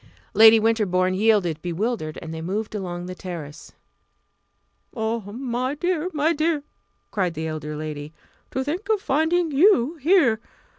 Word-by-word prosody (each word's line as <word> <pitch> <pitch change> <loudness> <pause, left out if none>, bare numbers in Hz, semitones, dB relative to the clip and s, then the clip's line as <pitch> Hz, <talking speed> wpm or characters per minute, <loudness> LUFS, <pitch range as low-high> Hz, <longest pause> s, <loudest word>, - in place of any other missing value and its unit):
Lady 225 0 +8
Winterbourne 200 -5 +1
yielded, 190 -6 +2
bewildered, 175 -2 -2
and 160 -1 -7
they 160 - -5
moved 205 +6 -3
along 175 -4 -4
the 185 - -6
terrace. 165 -5 -8 1.2
"Oh, 225 0 -1
my 255 +3 -2
dear, 350 +1 -1
my 310 +1 +1
dear!" 310 -1 0 0.5
cried 180 -5 -1
the 160 - -3
elder 155 -1 -4
lady 150 -1 -6 0.4
"to 265 - -2
think 350 +10 -4
of 435 -2 +3
finding 320 +1 +1
you 310 - +4
here! 295 - +3
220 Hz, 140 wpm, -23 LUFS, 175-295 Hz, 1.2 s, Lady